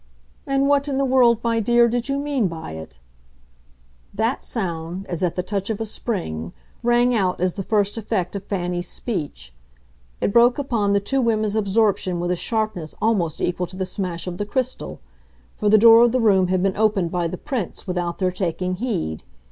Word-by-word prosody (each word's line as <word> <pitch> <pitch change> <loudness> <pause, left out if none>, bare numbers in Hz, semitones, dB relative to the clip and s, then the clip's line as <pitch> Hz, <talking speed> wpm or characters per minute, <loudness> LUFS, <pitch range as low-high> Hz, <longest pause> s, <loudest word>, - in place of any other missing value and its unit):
"And 275 0 +2
what 285 0 +2
in 275 -2 -1
the 275 - +2
world, 245 -3 +4
my 230 -1 +1
dear, 235 +2 +4
did 240 +2 -2
you 275 - 0
mean 280 -6 0
by 165 - -7
it?" 80 -5 -9 1.2
that 225 +5 0
sound, 175 -3 -4
as 175 -2 -5
at 180 -3 0
the 180 - -1
touch 195 +1 -3
of 220 - -2
a 225 - -2
spring, 85 - -4 0.3
rang 240 +1 +3
out 190 -5 +1
as 180 0 +1
the 200 - -4
first 205 +2 0
effect 205 -4 -2
of 200 - -4
Fanny's 180 -2 -2
speech. 145 - -5 0.7
It 200 - 0
broke 240 +1 +5
upon 230 -8 0
the 200 - +4
two 265 +7 0
women's 215 -3 +1
absorption 200 -3 +1
with 175 +1 -1
a - - +1
sharpness 215 -5 -2
almost 190 -9 0
equal 180 0 -1
to 185 - -12
the 190 - -1
smash 180 -3 -4
of 180 0 -6
the 205 - -1
crystal, 255 +3 -3 0.6
for 210 - 0
the 215 - +7
door 225 +1 +8
of 240 0 +3
the 255 - +2
room 195 -5 +4
had 185 0 +1
been 195 -1 0
opened 205 -5 +1
by 175 -2 0
the 180 - -5
Prince 250 - -4
without 180 -2 -2
their 185 -1 0
taking 185 0 -2
heed. 80 - -2
200 Hz, 195 wpm, -22 LUFS, 180-235 Hz, 1.2 s, door